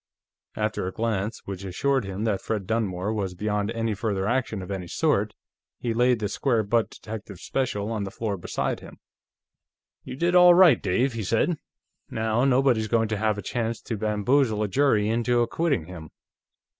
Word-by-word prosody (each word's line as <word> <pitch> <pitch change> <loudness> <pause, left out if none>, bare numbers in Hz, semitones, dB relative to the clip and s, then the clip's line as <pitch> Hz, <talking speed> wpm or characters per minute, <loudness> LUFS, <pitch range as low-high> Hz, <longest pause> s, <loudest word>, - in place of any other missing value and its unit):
After 105 -3 -1
a - - -3
glance 110 0 -2
which 95 -1 -6
assured 130 +7 0
him 95 +2 -4
that 105 -4 0
Fred 105 -4 -3
Dunmore 105 -2 -1
was 95 -4 -3
beyond 105 +1 -1
any 115 -1 -1
further 100 -3 -2
action 115 -4 -1
of 90 - -8
any 95 -3 -4
sort, - - 0 0.4
he 120 -2 -2
laid 125 +1 +3
the 105 -2 -2
square 115 +2 +1
butt 115 +2 +1
Detective 105 -4 -9
Special 105 0 -2
on 110 -3 -2
the 100 - -4
floor 105 0 -3
beside 90 - -3
him. - - -13 1.1
"You - - -7
did 170 +5 +1
all 180 -1 +8
right, 175 -9 +6
Dave," 120 +8 +1
he 115 - -3
said. 115 - +1 0.5
"Now, 110 +3 0
nobody's 130 -4 +3
going 115 -1 +1
to 110 - -1
have 110 0 0
a 105 - -5
chance 115 -1 -2
to 115 - -4
bamboozle 110 +2 +1
a - - 0
jury 110 -2 +2
into 120 +2 +1
acquitting 140 - 0
him." 85 -3 -9
110 Hz, 180 wpm, -25 LUFS, 100-120 Hz, 1.1 s, all